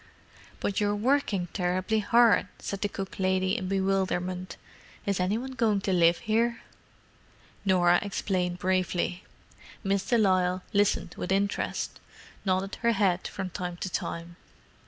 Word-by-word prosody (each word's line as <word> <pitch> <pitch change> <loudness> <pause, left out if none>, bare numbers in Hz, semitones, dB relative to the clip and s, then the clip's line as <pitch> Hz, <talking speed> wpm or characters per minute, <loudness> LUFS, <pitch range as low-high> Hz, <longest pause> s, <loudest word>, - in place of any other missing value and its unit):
"But 200 - -1
you're 205 0 +2
working 215 -5 +1
terribly 185 +3 0
hard," 230 +1 +4
said 200 - -5
the 205 - 0
cook 195 0 -6
lady, 185 0 +1
in 185 - -3
bewilderment. 185 -2 -1 0.5
"Is 200 -2 0
any 185 +4 +1
one 260 +3 -5
going 225 -5 +1
to 195 - 0
live 170 -1 +5
here?" 230 +2 +1 1.0
Norah 175 -2 +4
explained 185 -3 -1
briefly. 185 -1 0 0.6
Miss 195 -1 +1
de 240 - +2
Lisle 185 -3 +2
listened 200 -4 +2
with 180 - -3
interest, 200 +1 -1 0.4
nodding 190 0 -1
her 235 0 +3
head 190 -4 +1
from 190 -2 -5
time 180 0 -4
to 185 - -4
time. 170 +1 -4
190 Hz, 135 wpm, -28 LUFS, 180-205 Hz, 1.0 s, live